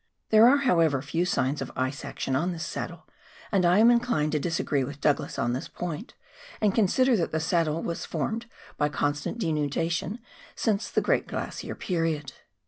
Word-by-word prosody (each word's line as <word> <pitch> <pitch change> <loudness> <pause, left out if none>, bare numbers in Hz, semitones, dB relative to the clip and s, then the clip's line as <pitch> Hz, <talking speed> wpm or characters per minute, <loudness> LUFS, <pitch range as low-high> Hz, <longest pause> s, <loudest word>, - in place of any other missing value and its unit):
There 220 +1 +8
are, 280 - +5
how 255 -12 +2
ever, 155 -5 +3
few 165 +4 -1
signs 140 -5 0
of 135 - -5
ice 130 +2 -2
action 130 - -3
on 175 +7 0
this 170 0 -5
saddle, - - -6 0.4
and 190 -4 +3
I 180 +2 +4
am 230 +3 +7
inclined 235 -11 +1
to 150 - +1
disagree 150 -4 0
with 140 +2 -6
Douglas 145 0 0
on 120 - 0
this 130 - -3
point, 175 - -6 0.4
and 210 -3 +2
consider 240 +4 +3
that 170 - -1
the 160 - 0
saddle 165 -1 0
has 170 - -3
formed 230 +1 -3 0.3
by 150 0 +2
constant 145 +6 -1
denudation 165 - -1 0.4
since 215 -2 0
the - - +1
great - - +1
glacier - - -5
period. 165 -6 -2
165 Hz, 180 wpm, -27 LUFS, 145-205 Hz, 0.4 s, There